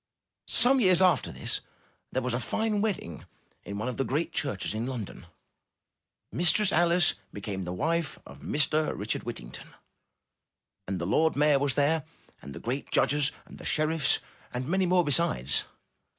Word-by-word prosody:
Some 255 +3 +4
years 185 -6 +5
after 180 -7 +3
this, - - -1 0.5
there 130 - -1
was 125 -1 -1
a 120 - 0
fine 215 - -1
wedding 185 - -3 0.4
at 100 - -5
one 110 +4 -3
of 125 - -4
the 135 - +1
great 150 +6 -1
churches 135 -10 -1
in 110 +3 -3
London. 115 -9 -6 1.0
Mistress 180 +4 +4
Alice 175 0 +4 0.2
became 100 -1 -5
the 90 -1 -4
wife 160 - -1
of - - -12
Mr. 150 +1 +1
Richard 105 +2 -2
Whittington. 65 - -8 1.1
And 95 0 -2
the 85 - -3
lord 160 - +2
mayor 145 -1 +4
was 140 -2 0
there, 150 +2 +2 0.4
and 70 - -9
the - - -7
great 130 +4 -4
judges, 145 0 +2
and - - -13
the - - -10
sheriffs, 155 -2 +2 0.3
and 125 +1 -4
many 185 +2 +1
more 180 0 +4
besides. 145 - +1
145 Hz, 160 wpm, -28 LUFS, 115-170 Hz, 1.1 s, years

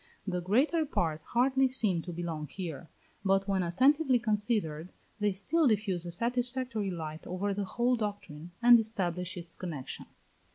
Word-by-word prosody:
The 180 -3 -2
greater 265 - +2
part 165 - -1
hardly 265 +2 +3
seem 215 -9 +2
to 175 - -7
belong 165 -3 -4
here, 170 -2 -7 0.3
but, 195 0 +2
when 195 -1 +1
attentively 260 - +3
considered, 210 -8 -1 0.3
they 210 -1 +2
still 285 - +2
diffuse 195 -6 0
a - - -5
satisfactory 245 +1 -1
light 160 -3 -6
over 195 +3 -2
the 200 0 -2
whole 240 +6 +1
doctrine, 205 -8 -5
and 240 0 +9
establish 180 -5 -2
its 170 -1 -3
connexion. 155 -8 -6
200 Hz, 150 wpm, -30 LUFS, 175-240 Hz, 0.3 s, and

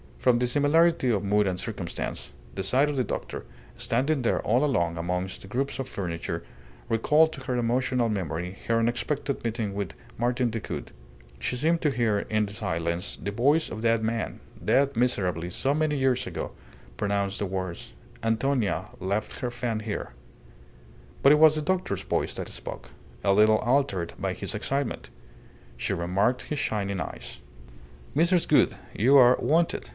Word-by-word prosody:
From 125 -2 +3
the 125 - +1
similarity 145 +2 +3
of 105 -4 +1
mood 105 0 +2
and 90 -1 -1
circumstance, 100 -6 -4 0.2
the 95 - -3
sight 130 +9 +3
of 145 - -2
the 130 - +1
doctor, - - -5 0.3
standing 135 +5 +1
there 120 - +1
all 120 +6 +2
alone 85 - +1
amongst 90 +2 -2
the - - -10
groups 135 +6 -2
of 135 - -3
furniture, 85 -4 -4 0.5
recalled 150 +8 +4
to 135 - -8
her 125 - -1
emotional 125 +1 +1
memory 90 -3 -3
her 115 - +3
unexpected 120 +5 -1
meeting 110 -3 -2
with 100 -7 -3 0.3
Martin 120 0 +1
Decoud; 110 -2 -5 0.5
she 65 - -1
seemed 160 +6 +1
to 150 - +3
hear 115 -6 +1
in 110 +1 0
the 100 - -8
silence 85 -2 -2
the 100 - -4
voice 140 +9 +2
of 110 - -5
that 115 -1 +2
man, 115 0 -2 0.2
dead 140 0 +3
miserably 90 -8 0
so 135 +9 0
many 155 -1 +1
years 130 -2 +1
ago, - - -4 0.5
pronounce 100 -1 -1
the 100 - -1
words, 95 -2 -4 0.3
"Antonia 115 -1 0
left 100 +3 -2
her 125 - -2
fan 120 -2 -2
here." 105 -1 -4 1.1
But 140 - +8
it 150 - +6
was 155 -1 +7
the 155 - 0
doctor's 185 +2 -1
voice - - -1
that - - -5
spoke, - - -8 0.3
a 100 - +4
little 110 +2 +5
altered 120 -8 +1
by - - -1
his - - -3
excitement. 135 -3 -2 0.7
She - - -1
remarked 100 +8 +1
his 150 - -3
shining 100 -5 -1
eyes. - - -6 0.8
"Mrs. 170 +3 +3
Gould, - - +4 0.2
you 130 +7 +5
are 125 -1 +8
wanted. 165 - +1
115 Hz, 165 wpm, -27 LUFS, 100-135 Hz, 1.1 s, But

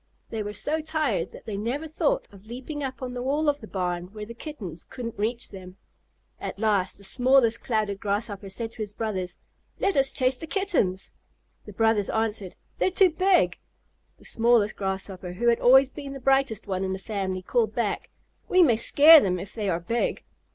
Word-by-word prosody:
They 225 - -2
were 205 0 -4
so 305 +8 -2
tired 305 - -1
that - - -13
they 215 - -4
never 250 +9 -3
thought - - 0
of 200 +1 -16
leaping 265 +5 -6
up 260 -1 -5
on 250 -1 -4
the 245 - -4
wall 290 +4 0
of 290 -1 +1
the 220 - -9
barn 180 -2 -2
where 210 -1 -6
the 230 - -9
Kittens 220 - -7
couldn't 235 -3 -7
reach 235 +3 -2
them. 185 -1 -11 0.6
At - - -5
last 200 -3 +1
the 200 - -16
smallest 245 +1 +3
Clouded 215 -4 -1
Grasshopper 205 -1 -3
called 225 +4 -4
to - - -14
his 210 -1 -4
brothers, 190 -5 -3 0.4
"Let 395 -1 +1
us 270 -1 +4
chase 255 0 +1
the 325 - -8
Kittens." 310 - 0 0.5
The 210 - -10
brothers 225 -1 +2
answered, 215 -4 -2 0.2
"They're - - +3
too 375 -1 +4
big." 370 +3 +2 0.6
The - - -20
smallest 230 -2 +2
Clouded 190 -1 -2
Grasshopper, 185 -2 -8
who 235 +6 +1
had 235 - +3
always 265 +2 +6
been 280 -2 -7
the 275 - -7
brightest 270 -4 +1
one 190 -1 -2
in 190 0 -1
the - - -3
family, 190 -2 -3
called 465 - 0
back, - - -2 0.4
"We 365 0 +6
may 240 -8 +4
scare 305 +7 +8
them 180 -5 0
if 190 +3 -8
they 210 -3 -2
are 170 -2 0
big." 230 +8 -2
225 Hz, 200 wpm, -26 LUFS, 195-275 Hz, 0.6 s, scare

